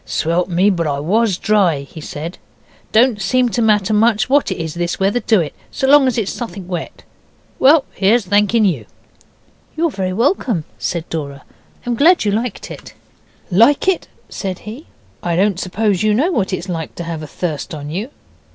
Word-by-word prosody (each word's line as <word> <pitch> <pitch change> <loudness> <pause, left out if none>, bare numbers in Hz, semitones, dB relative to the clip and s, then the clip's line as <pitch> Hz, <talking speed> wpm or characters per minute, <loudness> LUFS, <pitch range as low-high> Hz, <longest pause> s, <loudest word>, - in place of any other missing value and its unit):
'Swelp 170 +3 -1
me, 185 +4 +3
but 170 -4 -1
I 140 -1 -1
WAS 200 +5 +1
dry,' 190 -10 +2
he 145 +3 -11
said. 155 +4 -7 0.5
'Don't 225 -2 +3
seem 250 +5 +2
to 230 +2 -1
matter 215 -2 +2
much 215 0 +3
what 285 +1 +3
it - - -3
is, 160 -3 -4
this 175 0 -3
weather, 195 +5 +1
do 220 -4 +2
it? 150 -3 -4 0.2
so 265 - -2
long 280 -1 +6
as 255 - 0
it's 210 -4 -1
suthink 195 -6 -7
wet. 175 -3 -6 0.6
Well, 285 +2 +5
here's 210 +3 +2
thanking 210 +3 +3
you.' 185 -5 -1 0.9
'You're 330 0 +1
very 185 -5 -2
welcome,' 230 - 0 0.2
said 170 -1 -3
Dora; 140 -3 -5 0.4
'I'm 245 - -1
glad 315 +4 +4
you 205 - +2
liked 225 +1 -3
it.' - - -11 0.6
'Like 230 - +4
it?' 380 -2 +1 0.2
said 190 -3 -5
he. 235 +9 -9 0.3
'I 170 -1 -1
don't 190 0 +1
suppose 195 0 0
you 215 -1 +2
know 305 - +2
what 205 - 0
it's 185 0 -3
like 165 -4 -5
to 170 - -5
have 165 -2 -5
a 155 - -7
thirst 160 0 -4
on 145 0 -7
you. 200 - -4
200 Hz, 190 wpm, -18 LUFS, 170-235 Hz, 0.9 s, long